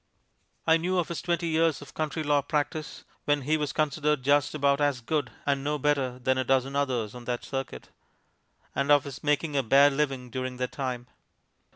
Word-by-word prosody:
I 160 0 +5
knew 180 +3 -1
of 175 - 0
his 170 - -4
twenty 170 -1 -1
years 165 -2 +2
of 145 0 -12
country 155 0 -2
law 145 -1 +3
practise, 150 +2 -3 0.2
when 145 -1 +2
he 155 +4 +2
was 150 -3 -1
considered 150 -2 0
just 145 +2 +2
about 140 -1 +2
as 145 -3 +2
good 140 +1 -1 0.2
and 140 -1 0
no 150 +1 0
better 140 -3 0
than 130 +1 0
a - - +1
dozen 135 +1 +1
others 125 -7 -1
on 125 -1 -10
that 120 0 -3
circuit, 135 - -5 0.8
and 140 +1 0
of 145 -2 +6
his 140 -3 -8
making 150 +1 0
a 140 - +3
bare 140 +4 +5
living 135 -3 -2
during 130 0 -4
that 125 0 -2
time. 125 -3 -4
140 Hz, 195 wpm, -27 LUFS, 130-150 Hz, 0.8 s, of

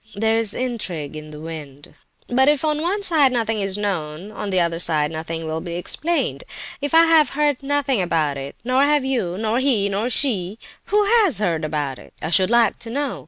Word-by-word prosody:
There 220 +2 +1
is 225 -2 0
intrigue 195 - -4
in 155 0 -8
the 150 0 -10
wind; 150 -3 -9 0.3
but 265 +2 +3
if 295 +1 +1
on 305 0 0
one 390 +5 -1
side 305 -8 +4
nothing 225 -3 0
is 195 0 0
known, 185 -2 -3
on 210 -1 -5
the 185 -1 +2
other 170 -1 0
side 155 -3 +1
nothing 160 +1 -4
will 160 0 -3
be 170 0 -5
explained. 325 - -2 0.4
If 285 +3 -1
I 330 0 +8
have 325 -2 +5
heard 295 -3 +1
nothing 275 -4 0
about 160 -5 0
it, 135 0 -7
nor 255 +2 +2
have 290 -1 +3
you, 215 -10 -1
nor 220 +3 0
he, 240 -7 +2
nor 205 +5 -1
she—who 235 - -1 0.2
has 350 - +2
heard 170 -6 0
about 150 -3 -2
it, - - -16
I 160 - -4
should 185 +1 +4
like 235 -2 +3
to 235 - -6
know? 280 +2 -2
210 Hz, 205 wpm, -21 LUFS, 165-270 Hz, 0.4 s, I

